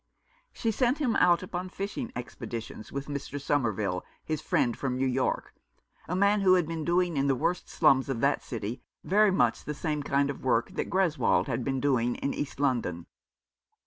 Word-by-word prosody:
She 230 - -1
sent 250 +4 +1
him 270 -7 0
out 175 0 +4
upon 185 0 -4
fishing 205 +6 -4
expeditions 115 -3 -7
with 140 0 -4
Mr. 145 0 -5
Somerville, 110 -10 0 0.2
his 155 -2 -2
friend 120 -5 +1
from 130 -2 -2
New 135 - +1
York 130 0 -1 0.3
— - - -32
a 180 - 0
man 200 +2 +3
who 185 -1 +6
had 175 -4 +2
been 165 -1 -3
doing 175 -1 +1
in 140 +1 +2
the 135 - +3
worst 175 +8 -1
slums 135 -4 +3
of 130 -4 -1
that 140 +1 +2
city 115 -1 -5 0.2
very 210 +2 +4
much 125 -11 +2
the 150 - -4
same 150 -1 -2
kind 140 0 +1
of 140 - -10
work 120 -3 +1
that - - -3
Greswold 185 -5 +2
had 125 -2 -2
been 135 +1 -1
doing 125 -3 +1
in 140 - -2
East 145 -2 -4
London. 120 -12 0
140 Hz, 190 wpm, -28 LUFS, 125-180 Hz, 0.3 s, who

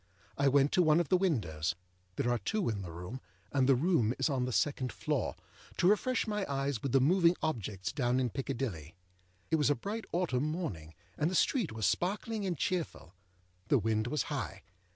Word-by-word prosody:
I 140 - +2
went 140 +1 +4
to 180 - +4
one 155 -1 +5
of 170 - -1
the - - +5
windows 95 - 0 0.4
(there 120 - 0
are 120 - +1
two 200 - -1
in 105 -3 -2
the 90 -3 -7
room, 90 +10 -7 0.3
and 135 -1 +2
the 135 - +7
room 130 - +2
is 160 - +1
on 130 -2 0
the 125 - -2
second 130 -1 0
floor) - - -2 0.4
to 175 - +3
refresh 220 +5 +2
my 210 -2 -1
eyes 135 -3 -1
with 135 - -2
the 135 - +5
moving 170 +5 +4
objects 105 - -2
down 125 -3 +1
in 125 -3 0
Piccadilly. 115 - -4 0.6
It 160 - +4
was 150 -1 +2
a 145 - +3
bright 210 - -5
autumn 155 -6 0
morning, 95 - -5 0.2
and 155 - +2
the 185 - -2
street 230 - +2
was 110 -2 -2
sparkling 205 +3 0
and 175 -3 -2
cheerful. 165 - -3 0.5
The 140 - +4
wind 110 0 0
was 150 +4 0
high. 135 -10 -4
135 Hz, 195 wpm, -32 LUFS, 110-175 Hz, 0.6 s, the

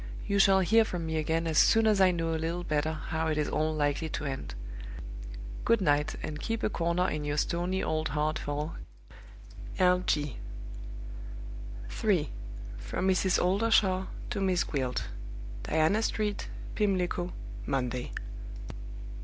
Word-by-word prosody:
You 200 0 +2
shall 195 -1 +7
hear 225 +5 +6
from 180 -6 -3
me 160 0 -1
again 160 +2 +1
as 160 -2 +3
soon 225 0 +6
as 210 -3 +4
I 190 - +8
know 165 -2 0
a - - +1
little 165 +2 -1
better 155 -1 +1
how 160 +1 -2
it 155 -1 +1
is 150 - +1
all 155 +1 +1
likely 150 +1 0
to 150 - -3
end. 135 - -4 1.1
Good 230 - +4
night, 150 -5 +2
and 150 -1 -4
keep 225 0 -2
a - - +2
corner 170 +1 +1
in 150 -4 -1
your 145 0 -1
stony 175 +4 0
old 155 0 0
heart 155 +1 0
for 150 +2 -3 1.0
"L. 180 -1 +5
G." 145 -4 +1 1.5
3. 185 -9 +1 0.5
From 190 - -1
Mrs. 185 0 +3
Oldershaw 190 -1 +3 0.2
to 200 - -1
Miss 185 -2 +3
Gwilt. 130 -4 -1 0.6
"Diana 160 +7 +3
Street, 210 -2 -1 0.3
Pimlico, 180 -3 +1 0.4
Monday. 125 -2 -1
165 Hz, 145 wpm, -30 LUFS, 150-190 Hz, 1.5 s, I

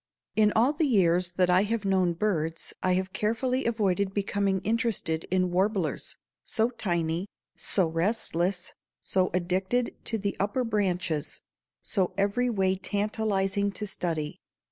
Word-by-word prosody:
In 215 -1 +4
all 240 +6 +4
the 305 0 +1
years 180 -6 +3
that 180 0 +3
I 180 +1 +5
have 215 +1 -1
known 185 -3 +2
birds 165 -4 -2
I 185 - +2
have 185 0 -2
carefully 250 +5 0
avoided 200 -4 0
becoming 200 -1 0
interested 220 -8 0
in 185 -1 +1
warblers, 190 -1 0 0.3
so 225 +1 +1
tiny, 175 -5 -1 0.3
so 190 - 0
restless, 175 +1 -1 0.3
so 185 -1 +1
addicted 185 +7 0
to 225 - -1
the 200 -1 -2
upper 205 +6 0
branches, 180 -8 -1 0.4
so 185 -3 0
every 205 +5 +1
way 190 -4 +1
tantalizing 200 -1 0
to 210 - -4
study. 165 -6 -2
195 Hz, 135 wpm, -28 LUFS, 180-215 Hz, 0.4 s, I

